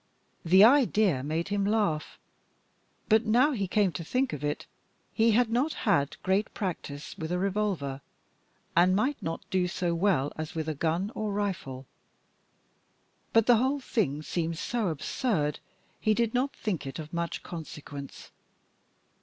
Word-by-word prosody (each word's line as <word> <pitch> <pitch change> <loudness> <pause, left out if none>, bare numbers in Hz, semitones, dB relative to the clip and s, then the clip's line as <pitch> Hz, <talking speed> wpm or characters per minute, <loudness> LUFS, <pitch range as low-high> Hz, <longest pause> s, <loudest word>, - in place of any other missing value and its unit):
The 185 +4 +7
idea 220 - +4
made 160 +6 -2
him 205 -1 0
laugh. 200 -7 0 0.9
But 220 +1 +3
now 250 +7 +4
he 200 -8 -1
came 200 0 +2
to 165 +2 -5
think 255 +9 0
of 150 -1 -5
it, 145 0 -2 0.5
he 225 0 +3
had 235 0 +3
not 260 +7 +1
had 170 -10 +2
great 195 +3 +1
practice 155 -7 -5
with 160 +1 -4
a 180 - +1
revolver, 185 -8 -1 0.7
and 180 +2 +5
might 260 +8 0
not 165 0 -5
do 185 -1 +2
so 175 -1 -1
well 165 -6 +1
as 155 0 -6
with 160 -1 -2
a 155 - -1
gun 165 +7 -1
or 215 -1 -3
rifle. 180 -11 -3 1.5
But 225 -1 +4
the 240 -1 +6
whole 265 +5 +1
thing 160 - -1
seemed 165 0 -2
so 230 +3 -1
absurd, 155 - -1 0.4
he 215 0 +2
did 230 -1 +1
not 260 +3 0
think 180 -10 -3
it 135 - -6
of 155 +1 -8
much 170 0 -3
consequence. 150 -4 -8
185 Hz, 155 wpm, -28 LUFS, 155-220 Hz, 1.5 s, The